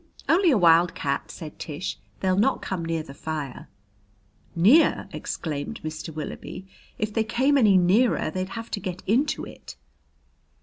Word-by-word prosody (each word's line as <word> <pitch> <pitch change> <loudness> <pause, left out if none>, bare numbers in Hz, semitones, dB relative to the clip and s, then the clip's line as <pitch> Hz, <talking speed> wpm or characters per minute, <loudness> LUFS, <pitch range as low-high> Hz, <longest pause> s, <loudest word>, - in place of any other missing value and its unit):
"Only 355 +2 +4
a 265 - +4
wildcat," 165 -5 +3
said 155 -3 -9
Tish. 160 +3 -5 0.2
"They'll 185 -1 +2
not 220 +8 +2
come 185 -3 -3
near 165 -1 -2
the 135 - -11
fire." 150 -3 -6 0.9
"Near!" 220 - +5
exclaimed 145 -3 -4
Mr. 155 +1 -5
Willoughby. 155 +4 -7 0.3
"If 215 0 -2
they 225 - +2
came 260 +6 +2
any 215 -8 +5
nearer, 185 0 +3
they'd 185 +2 -3
have 230 0 -7
to - - -2
get 185 -1 -6
into 265 +9 +1
it!" - - -11
185 Hz, 145 wpm, -25 LUFS, 160-225 Hz, 0.9 s, Near